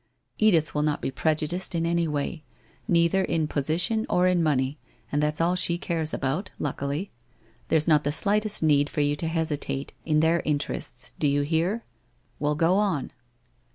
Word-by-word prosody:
Edith 170 -8 +3
will 150 - 0
not 150 -1 0
be - - -3
prejudiced 160 +6 0
in 165 0 0
any 170 0 +1
way 150 +2 -3 0.2
— - - -33
neither 170 +2 +3
in 160 -4 0
position 165 +11 0
or 180 - +3
in 180 -1 +3
money, 145 -2 0 0.3
and 145 - +1
that's 150 0 0
all 170 +2 +2
she 175 -1 0
cares 165 -3 0
about, 150 +9 -2
luckily. 145 +6 -3 0.6
There's 155 0 +2
not 150 -2 +4
the 145 - 0
slightest 210 +4 +2
need 145 -2 +3
for 150 - -1
you 145 0 +1
to 165 - -3
hesitate, 155 -4 -2
in 155 -1 +2
their 165 +1 +2
interests, 145 -4 -3
do 150 - +2
you 145 0 +2
hear? 170 +9 0 0.6
Well, 150 +1 0
go 170 +4 +3
on 195 -10 0
160 Hz, 175 wpm, -26 LUFS, 145-175 Hz, 0.6 s, not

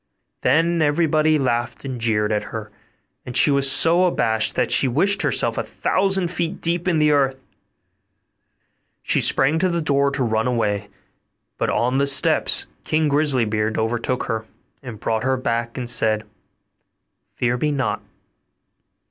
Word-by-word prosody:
Then 165 +5 +1
everybody 155 0 +2
laughed 120 -2 -2
and 130 -3 -6
jeered 105 -2 0
at 105 -1 -1
her; 110 -2 -8 0.5
and 125 0 -2
she 145 - +5
was 140 -1 +4
so 165 +6 +4
abashed, 110 -10 +1
that - - -1
she 135 - +4
wished 195 +11 +1
herself - - +1
a - - -2
thousand 190 -2 -1
feet 175 +1 -3
deep 170 +2 -2
in 175 -3 +1
the 150 -1 +3
earth. 135 -2 +1 1.6
She - - +1
sprang 140 +4 +3
to 185 +1 +1
the 170 -1 -1
door 140 -3 +2
to 140 -1 -2
run 110 0 -1
away; 105 -4 -2 0.7
but - - -1
on 125 +3 0
the 140 - +1
steps 140 -1 +2 0.2
King 155 -1 0
Grisly 140 -4 +1
beard 110 0 -2
overtook 120 +3 -2
her, 110 -2 -4 0.3
and 120 -5 -9
brought 110 0 -2
her 130 +1 0
back 115 -1 -3
and 125 -2 -4
said, 110 -2 +1 1.1
'Fear 120 0 -1
me 150 +4 -1
not! 135 -5 -2
130 Hz, 155 wpm, -21 LUFS, 115-155 Hz, 1.6 s, she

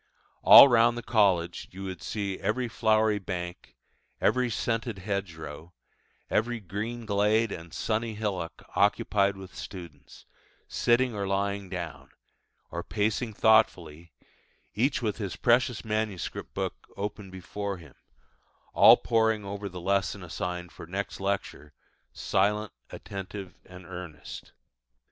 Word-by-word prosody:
All - - +11
round 120 -1 +4
the 120 - -5
college 95 -6 +2
you 95 +1 -9
would 95 -2 -6
see 100 -3 -3
every 125 -1 -1
flowery 110 -2 +2
bank, 90 -2 -6 0.4
every 125 -1 +2
scented 115 0 -2
hedgerow, 85 -4 -5 0.5
every 120 +2 0
green 110 +5 -5
glade 105 +2 +2
and 85 -2 -7
sunny 110 0 -2
hillock 95 -6 -4
occupied 100 0 +2
with 95 -1 -10
students, 80 -7 -10 0.4
sitting 120 +1 +2
or 100 -2 -3
lying 100 0 -1
down, 85 -3 -6 0.6
or 85 - -3
pacing 110 +3 -1
thoughtfully, 85 -8 +2 0.6
each 125 +3 +1
with 105 -2 -1
his 100 -5 -4
precious 120 0 +2
manuscript 110 -3 -3
book - - -4
open 105 0 -5
before 95 +2 -5
him, 80 -6 -14 0.8
all - - +8
poring 110 -2 +1
over 100 0 -5
the 90 -1 -8
lesson 100 +1 0
assigned 90 0 -4
for - - -11
next 100 +4 -4
lecture, 95 -6 -3 0.4
silent, 105 +1 0 0.2
attentive, 95 0 -7
and 90 -1 -12
earnest. 90 -4 -9
100 Hz, 120 wpm, -28 LUFS, 90-110 Hz, 0.8 s, All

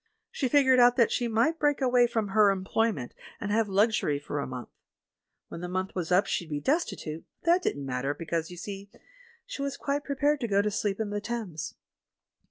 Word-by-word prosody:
She 315 - -1
figured 260 -2 +5
out 245 0 +6
that 235 -3 +3
she 240 - 0
might 235 +9 +1
break 290 -2 +2
away 250 -2 +4
from 225 -3 -1
her 210 +1 +5
eoiployment 190 - -1 0.3
and 205 - -3
have 220 0 +2
luxury 200 -7 +2
for 145 0 -4
a 140 - -3
month. 125 -1 -7 0.8
When 170 - -7
the 180 - -5
month 185 +1 -2
was 180 -2 -3
up 180 +3 +4
she'd 170 - -2
be 145 -1 -2
des 280 - +3
titute, 155 - -6 0.2
but 335 - +3
that 360 +2 +4
didn't 145 - -2
matter 135 +2 -2
because, 165 -1 -3
you 175 - -10
see, 195 +2 -7 0.6
she - - -6
was 280 0 -3
quite 285 +1 -2
prepared 290 +1 +1
to 240 - -2
go 200 -1 +2
to 210 - 0
sleep 200 0 -1
in 215 -2 -2
the 205 0 -2
Thames. 205 -9 -5
210 Hz, 210 wpm, -28 LUFS, 175-250 Hz, 0.8 s, out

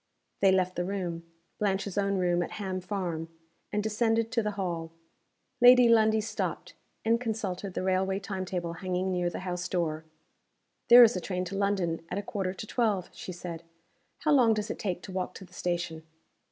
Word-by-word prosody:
They 195 -1 +5
left 185 -1 +1
the 175 - +1
room 175 -3 -4 0.3
Blanche's 195 -1 -1
own 200 -1 +1
room 175 -1 +2
at 175 - -4
Ham 190 -2 -3
Farm 175 -4 -3 0.4
and 210 0 0
descended 225 +1 +1
to 235 - +2
the 210 - -1
hall. 170 -4 -3 0.7
Lady 245 0 +8
Lundie 220 -1 +4
stopped, 220 - -4 0.3
and 230 +1 +3
consulted 200 -5 -3
the - - -2
railway 190 +1 +1
time 195 -1 -4
table 175 -2 -3
hanging 185 +1 -2
near 180 -1 0
the 175 - -6
house 180 -1 -3
door. 160 -3 -1 0.8
"There 245 0 +10
is 230 0 +5
a 185 - -2
train 180 0 -3
to 190 +2 -5
London 195 -5 0
at 180 - -3
a 200 - -2
quarter 195 -2 -2
to 215 - -6
twelve," 215 -5 0
she - - -7
said. 175 -2 -7 0.6
"How 305 - +2
long 245 -6 +5
does 210 0 -2
it - - -6
take 180 -3 -3
to - - -8
walk 185 0 -3
to 190 - -9
the 180 - -22
station?" 175 -2 -2
190 Hz, 190 wpm, -29 LUFS, 180-210 Hz, 0.8 s, There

